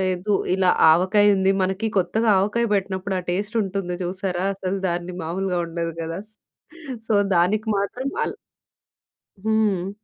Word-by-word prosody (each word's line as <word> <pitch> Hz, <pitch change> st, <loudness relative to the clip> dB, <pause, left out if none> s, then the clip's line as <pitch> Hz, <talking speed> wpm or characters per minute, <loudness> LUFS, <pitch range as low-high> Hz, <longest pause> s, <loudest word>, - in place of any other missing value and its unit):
లేదు 185 Hz, +2 st, -1 dB, 0.2 s
ఇలా 185 Hz, -1 st, +3 dB, 0.2 s
ఆవకాయి 190 Hz, +5 st, +4 dB
ఉంది. 190 Hz, 0 st, +3 dB
మనకి 190 Hz, +4 st, -1 dB
కొత్తగా 215 Hz, +6 st, +1 dB
ఆవకాయ 225 Hz, +4 st, +1 dB
పెట్టినప్పుడు 190 Hz, 0 st, -2 dB
ఆ -, -, -11 dB
టేస్ట్ 205 Hz, +5 st, -2 dB
ఉంటుంది 190 Hz, -2 st, -3 dB
చూశారా! 185 Hz, 0 st, -2 dB
అసలు 190 Hz, 0 st, -3 dB
దాన్ని 175 Hz, +1 st, -3 dB
మామూలుగా 180 Hz, +2 st, -2 dB
ఉండదు 165 Hz, 0 st, -4 dB
గదా! 165 Hz, +3 st, -4 dB, 0.9 s
సో, 220 Hz, -, +2 dB, 0.2 s
దానికి 205 Hz, +6 st, +2 dB
మాత్రం 245 Hz, +7 st, -2 dB, 0.2 s
అల -, -, -2 dB, 1.1 s
హ్మ్. 210 Hz, -4 st, +1 dB
190 Hz, 130 wpm, -23 LUFS, 180-205 Hz, 1.1 s, ఆవకాయి